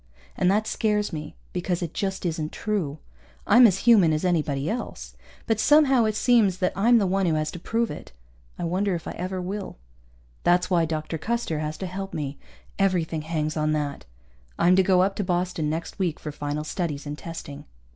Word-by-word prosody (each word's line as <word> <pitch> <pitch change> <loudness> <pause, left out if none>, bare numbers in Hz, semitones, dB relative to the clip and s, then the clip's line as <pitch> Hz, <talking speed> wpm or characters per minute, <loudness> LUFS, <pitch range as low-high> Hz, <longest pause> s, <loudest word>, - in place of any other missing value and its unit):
And 180 - +2
that 210 +3 +2
scares 210 -3 0
me 155 0 -6 0.2
because 180 0 -1
it 170 - -5
just 190 -1 -3
isn't 160 -2 -2
true. 185 -9 -2 0.5
I'm 240 +2 +8
as 195 -3 +1
human 200 -9 +6
as 155 +4 -1
anybody 150 -5 0
else. - - -5 0.3
But 225 -1 0
somehow 270 -2 +5
it 215 -1 0
seems 215 -6 +3
that 185 -1 0
I'm 235 +5 +5
the 210 - +2
one 190 0 +1
who 160 - +2
has 155 0 -1
to 175 - -8
prove 230 +6 -1
it. - - -9 0.5
I - - -5
wonder 185 +3 0
if 165 - -6
I - - -3
ever 185 +1 -4
will. 190 - -5 0.7
That's 175 +1 +3
why 170 -2 +3
Dr. 160 0 -3
Custer 230 -7 -2
has 155 0 -3
to 190 - -4
help 195 +2 -5
me. 140 -2 -4 0.4
Everything 175 -5 +1
hangs 155 -1 -2
on 155 -1 +1
that. 145 - -3 0.5
I'm 175 +2 +4
to 190 - +5
go 185 -1 +4
up 195 +1 0
to 205 - 0
Boston 175 -4 -1
next 165 +5 -4
week, 175 -5 -1
for 150 - -6
final 145 +1 -3
studies 155 -3 -3
and 145 0 -4
testing. 150 -3 -8
180 Hz, 195 wpm, -25 LUFS, 155-195 Hz, 0.7 s, I'm